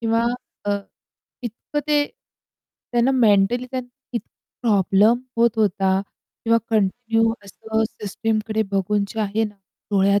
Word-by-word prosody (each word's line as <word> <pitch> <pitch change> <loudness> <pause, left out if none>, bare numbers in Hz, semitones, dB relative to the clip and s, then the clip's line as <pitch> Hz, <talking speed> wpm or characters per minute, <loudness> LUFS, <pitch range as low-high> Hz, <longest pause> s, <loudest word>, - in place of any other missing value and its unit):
किंवा 230 0 +2 0.4
अ, - - +2 0.7
इतकं 240 +5 -4
ते 295 -1 +4 0.9
त्यांना 240 +2 +3
मेंटली 235 0 +4
त्यांना 255 -1 -5 0.4
प्रॉब्लेम 210 +1 +4 0.2
होत 235 0 +5
होता 195 -2 +2 0.4
किंवा 230 0 +4
कंटिन्यू 225 +2 +2
असं 220 +3 -2
सिस्टमकडे 215 +1 -1
बघून 200 +1 +1
जे 220 - -4
आहे 215 +1 +1
ना 210 -1 -6 0.4
डोळ्यात 200 0 +4
220 Hz, 110 wpm, -22 LUFS, 200-235 Hz, 0.9 s, होत